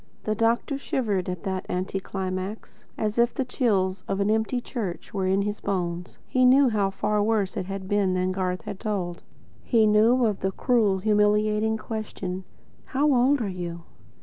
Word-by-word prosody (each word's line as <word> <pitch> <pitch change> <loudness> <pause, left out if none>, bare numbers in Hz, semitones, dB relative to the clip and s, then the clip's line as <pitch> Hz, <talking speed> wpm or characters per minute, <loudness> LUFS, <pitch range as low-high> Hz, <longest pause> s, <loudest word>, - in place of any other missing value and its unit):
The 215 - 0
doctor 230 +5 +1
shivered 205 -10 -1
at 180 -2 -5
that 190 -1 -3
anticlimax, 190 +2 -4
as 215 +1 -1
if 235 0 +3
the 265 - -1
chill 200 -7 +1
of 195 0 -1
an 200 +1 +2
empty 220 +3 +1
church 220 -8 -5
were 190 -2 0
in 195 +1 +2
his 210 +1 -3
bones. 175 -3 -3
He 255 - +2
knew 260 +1 +6
how 205 -3 +1
far 210 +2 0
worse 210 -3 +1
it 185 - -3
had 195 -1 -5
been 195 -2 +1
than 185 0 0
Garth 185 -1 -2
had 200 - -6
told. 190 -6 -3 0.4
He 225 -3 +3
knew 225 +4 +4
of 210 -3 0
the 190 0 -1
cruel, 220 -6 +2
humiliating 210 +2 +2
question: 205 -4 -5 0.4
"How 290 +1 +2
old 260 +2 +3
are - - -2
you?" 175 -2 -5
205 Hz, 175 wpm, -26 LUFS, 190-225 Hz, 0.4 s, knew